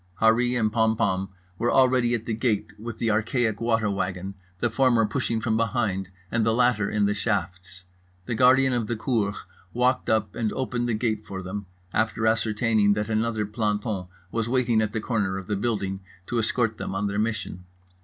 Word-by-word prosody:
Harree 120 +2 +3
and 110 -1 +1
Pompom 110 -4 +1 0.3
were 120 - +1
already 125 -2 +4
at 115 -1 -5
the 115 - -2
gate 110 -2 -1
with 115 0 -6
the 115 -1 +1
archaic 110 0 0
water 115 -2 +1
wagon, 95 -1 -2 0.2
the 120 +4 0
former 120 -2 +3
pushing 110 +2 -1
from 110 -1 0
behind 110 -5 0 0.2
and 115 -1 +1
the 110 0 +2
latter 120 -5 +2
in 105 -1 +1
the 100 - +2
shafts. 95 -3 -3 0.4
The 120 - -2
guardian 130 +2 +5
of 120 -3 -1
the 120 - -1
cour 110 -3 0 0.4
walked 125 +1 +1
up 110 -1 +1
and 110 -2 -1
opened 120 -2 -2
the 115 - +1
gate 110 -1 -1
for 95 -2 -7
them, 100 +2 -5 0.3
after 110 0 0
ascertaining 110 -1 +2
that 105 +1 -2
another 110 -1 0
planton 105 -2 -2 0.2
was 115 0 -1
waiting 120 -3 +2
at 105 -1 -1
the 110 - -2
corner 105 -5 -1
of 95 - -6
the 105 - -1
building 100 -3 -1 0.3
to 120 +3 -1
escort 115 0 0
them - - -4
on 100 +1 -1
their 100 0 -1
mission. 110 -5 -3
110 Hz, 185 wpm, -25 LUFS, 105-120 Hz, 0.4 s, guardian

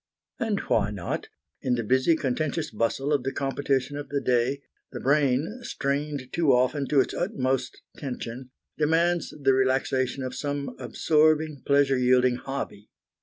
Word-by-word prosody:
And 220 -3 0
why 100 - +1
not? 100 -4 -4 0.3
In 125 -1 +1
the 115 - -2
busy, 130 +8 +3
contentious 155 +3 -2
bustle 115 +6 0
of 145 - +2
the 135 +2 -2
competition 135 0 -1
of 145 -1 -6
the 140 - 0
day, 130 +2 +1 0.3
the 120 - -6
brain, 140 - +1
strained 140 - -3
too 160 -5 +3
often 130 +3 +2
to 140 -3 +4
its - - -3
utmost 130 - -2
tension, 125 -1 -6 0.3
demands 165 +2 +2
the 135 -2 +3
relaxation 130 0 +1
of 130 0 -4
some 145 0 -3
absorbing, 155 -1 +2
pleasure 140 -2 +4
yielding 125 0 +4
hobby. 130 -6 -6
135 Hz, 145 wpm, -26 LUFS, 130-150 Hz, 0.3 s, to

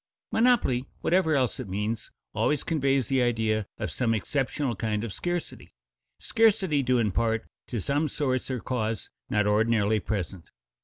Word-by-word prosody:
"Monopoly," 225 - +3
whatever 170 -3 +3
else 130 -5 +1
it - - -5
means, 105 +4 -2 0.2
always 150 - +1
conveys 135 -6 +1
the 135 -1 +2
idea 110 -3 +1
of - - -3
some 115 -3 +1
exceptional 135 +3 -1
kind 105 +1 -1
of 115 -5 -4
scarcity, 175 - -4 0.4
scarcity 200 -10 +3
due 125 -1 +2
in 110 -4 +2
part 115 +2 0 0.2
to 120 - -3
some 145 +9 0
source 130 -3 -1
or 130 -2 -2
cause 115 -3 -3 0.2
not 105 0 +2
ordinarily 110 0 +3
present. 95 -4 -4
120 Hz, 150 wpm, -27 LUFS, 110-140 Hz, 0.4 s, Monopoly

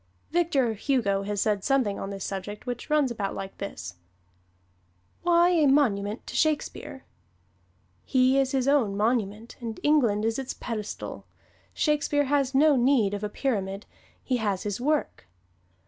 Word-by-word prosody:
Victor 300 -9 +2
Hugo 215 -4 0
has 205 -1 -2
said 205 -3 0
something 260 -8 +1
on 195 - -4
this 195 -1 -5
subject 200 +2 -6
which 245 +2 -5
runs 300 -4 +2
about 205 -4 -3
like 195 0 -6
this: 90 - -6 1.2
Why 345 0 +4
a 325 -5 +3
monument 220 -7 +1
to - - -8
Shakespeare? 310 -1 -1 1.0
He 260 0 +3
is 265 -1 +1
his 265 -1 0
own 245 -9 +2
monument 215 0 -1
and 230 -2 -5
England 235 -9 +3
is 225 +3 0
its 265 - -5
pedestal. 215 -3 -6 0.5
Shakespeare 290 -1 +1
has 275 -1 +1
no 295 +1 +5
need 240 -5 +3
of 205 0 -4
a 210 - -1
pyramid; 200 -5 -2 0.4
he 255 - 0
has 205 -5 -1
his 205 +2 -3
work. 295 - -1
240 Hz, 145 wpm, -26 LUFS, 205-280 Hz, 1.2 s, no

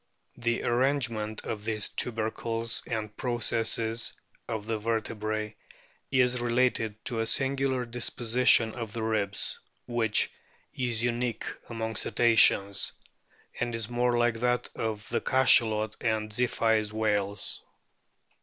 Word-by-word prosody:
The 120 0 0
arrangement 120 -4 0
of 105 -2 -4
these 110 -2 -1
tubercles 115 0 -1
and 105 -2 -4
processes 115 -1 0 0.3
of 110 -3 -4
the 110 -1 -2
vertebrae 110 -1 -2 0.5
is 125 -1 +2
related 120 -3 0
to 115 - +2
a 115 - 0
singular 135 -1 +1
disposition 120 -1 +3
of 115 -3 -6
the 115 -2 -3
ribs, 105 -2 0 0.3
which 115 -3 +1 0.4
is 120 -3 -1
unique 120 -1 -1 0.2
among 110 -2 -4
Cetaceans, 105 -4 +3 0.7
and 120 -1 -1
is 115 0 -3
more 120 0 +1
like 120 -1 +1
that 125 0 0
of 110 -2 -3
the - - 0
Cachalot 110 -5 +4
and 110 -2 -1
Ziphioid 110 -2 +1
whales. 105 -2 -1
115 Hz, 115 wpm, -28 LUFS, 110-120 Hz, 0.7 s, Cachalot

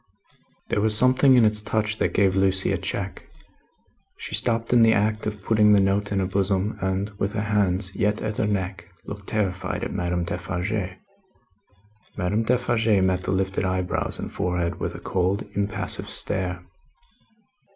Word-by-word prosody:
There 105 - +1
was 110 0 +4
something 130 +2 +5
in 120 -3 +6
its 105 0 +2
touch 110 0 -1
that - - 0
gave 95 -1 +3
Lucie 95 0 +2
a - - +1
check. - - -4 1.0
She - - -7
stopped 115 0 0
in 120 - +6
the 115 0 +6
act 105 +1 0
of 105 -2 -5
putting 105 -1 +4
the 100 - +6
note 100 +1 +1
in 100 - 0
her 95 - +1
bosom, 95 +2 0
and, 95 +2 -1
with 100 +2 -1
her 105 -1 -1
hands 100 -3 0
yet 105 0 0
at 105 -1 -4
her 105 - +1
neck, 95 -3 -3 0.2
looked 100 -1 -8
terrified 95 -4 -2
at - - -4
Madame 90 0 -1
Defarge. 90 +2 -3 1.2
Madame 100 +3 0
Defarge 115 -3 +2
met 95 -1 +1
the - - -1
lifted 95 +1 -1
eyebrows 95 -1 -2
and - - -6
forehead 90 -1 -2
with - - -3
a - - -7
cold, 95 +2 -1
impassive 100 0 -3
stare. 90 -1 0
100 Hz, 165 wpm, -24 LUFS, 95-110 Hz, 1.2 s, in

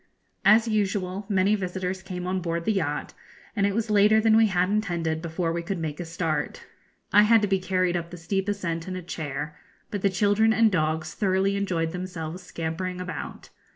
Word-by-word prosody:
As 225 +2 +6
usual 200 -2 -1
many 195 0 +3
visitors 185 -1 -2
came 180 -2 -6
on 185 0 -1
board 170 -1 -2
the 220 - +2
yacht, 155 -7 -2 0.4
and 200 -2 +2
it 200 - -2
was 225 -1 -1
later 210 +1 +5
than 220 0 +4
we 225 0 +6
had 180 -2 +1
intended 170 -6 -1
before 165 0 -2
we 170 - -2
could 185 +3 -3
make 155 -3 -4
a 175 - -4
start. 165 -1 -3 0.5
I 205 - +8
had 225 +2 +6
to - - +3
be 195 -1 +2
carried 185 -1 0
up 170 -1 -3
the 175 - -9
steep 195 +4 -2
ascent 170 -5 -3
in 185 - -4
a 185 - -5
chair, 150 -3 -5 0.3
but 205 - -3
the 200 - +3
children 205 +3 +3
and 225 -1 +4
dogs 155 -2 0
thoroughly 195 -1 +1
enjoyed 175 -5 -1
themselves 180 -1 -5
scampering 180 +1 -4
about. 180 0 -6
185 Hz, 195 wpm, -26 LUFS, 170-200 Hz, 0.5 s, I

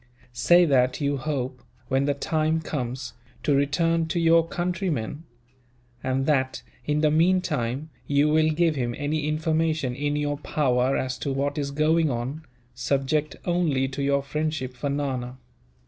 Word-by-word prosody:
Say 175 +7 +5
that 130 -4 +2
you 140 -1 0
hope, 130 -3 -3 0.3
when 135 +1 +1
the 145 0 +1
time 155 +2 0
comes, 130 -4 -4 0.3
to 145 - +2
return 165 +4 +2
to 170 +2 -1
your 165 0 +4
countrymen; 170 - -2 0.8
and 130 +1 0
that, 130 -3 0 0.2
in 150 0 +1
the 155 -1 +3
meantime, 155 -5 +1 0.2
you 145 +1 +3
will 155 +1 +3
give 165 +1 +2
him 120 -3 -2
any 150 +1 -1
information 155 -3 0
in 145 +3 -1
your 145 0 -1
power 135 -3 +1
as 130 0 -3
to 140 - -2
what 140 +2 -1
is 140 -1 -2
going 155 +2 +2
on, 130 +5 -3 0.3
subject 140 +4 0
only 165 -7 +1
to 135 +1 -5
your 140 0 +1
friendship 150 -2 -2
for 140 +3 -3
Nana. 130 -3 -2
145 Hz, 150 wpm, -25 LUFS, 135-155 Hz, 0.8 s, Say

